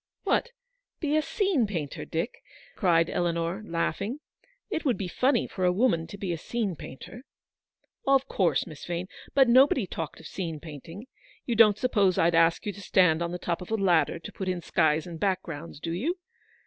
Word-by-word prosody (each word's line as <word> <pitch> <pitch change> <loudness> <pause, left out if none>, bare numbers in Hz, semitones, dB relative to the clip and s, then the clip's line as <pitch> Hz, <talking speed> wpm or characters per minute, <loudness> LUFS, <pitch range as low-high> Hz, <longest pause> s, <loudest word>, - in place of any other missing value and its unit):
"What, 485 - +1 0.5
be 300 -2 0
a 310 - +4
scene 350 - +1
painter, 160 -8 -4
Dick?" 165 +8 -3 0.3
cried 165 -5 +3
Eleanor, 170 +3 -1
laughing. 195 - -2 0.5
"It 330 -5 -1
would 255 -5 +1
be 195 - -3
funny 250 +7 +2
for 185 - -5
a 180 - +4
woman 180 -5 +2
to 200 - -9
be 195 -3 -2
a 165 - -5
scene 215 -2 -2
painter." 160 - -10 0.4
" - - -37
Of 270 0 +4
course, 185 -9 +1
Miss 155 -5 -11
Vane. 175 +1 -3 0.3
But 270 -2 +6
nobody 255 -1 +5
talked 165 -3 -6
of - - -14
scene 165 -5 -4
painting. 165 - -9 0.4
You 240 - -1
don't 215 -2 +6
suppose 205 -7 +2
I'd 170 +1 +3
ask 165 0 +3
you 205 - -2
to 200 - -11
stand 180 -4 +3
on 170 0 -1
the 180 - -3
top 175 0 -3
of 180 - -8
a 220 - +1
ladder 180 -7 +2
to 165 - -9
put 190 -1 -4
in 180 -2 -2
skies 155 0 +2
and 170 -2 -8
backgrounds, 170 -6 -3
do 165 - -4
you 280 - -1
185 Hz, 195 wpm, -27 LUFS, 165-230 Hz, 0.5 s, But